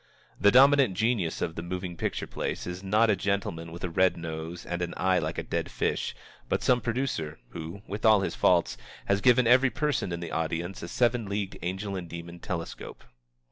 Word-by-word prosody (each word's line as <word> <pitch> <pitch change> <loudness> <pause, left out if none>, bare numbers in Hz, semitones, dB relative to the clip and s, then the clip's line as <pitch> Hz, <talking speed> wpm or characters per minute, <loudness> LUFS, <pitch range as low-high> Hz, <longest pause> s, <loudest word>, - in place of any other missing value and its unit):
The 100 - +6
dominant 135 -3 +6
genius 110 -6 0
of 80 - -2
the 85 - -5
moving 90 0 -5
picture - - -2
place - - -4
is 90 +1 -5
not 105 +3 +3
a - - +3
gentleman 95 -4 -2
with 85 - -9
a 90 - -1
red 95 +1 +3
nose 80 +1 -6
and 85 0 -3
an 85 0 -3
eye 95 0 +3
like 80 0 -3
a - - -2
dead - - -2
fish, - - -1 0.3
but - - 0
some 125 -1 +3
producer 115 - -2
who, 85 +5 -8
with 105 +2 -6
all 110 -3 +6
his 95 - -2
faults, - - +2 0.3
has 100 0 +1
given 125 +1 +5
every 125 +3 +6
person 140 -6 -1
in 85 - -3
the 85 -1 -6
audience 85 +3 -2
a 85 - -5
seven 120 +2 +1
leagued 100 -1 -2
angel 95 +3 -3
and 90 -3 -5
demon 85 +1 -8
telescope. 85 -2 -6
95 Hz, 200 wpm, -28 LUFS, 85-110 Hz, 0.3 s, The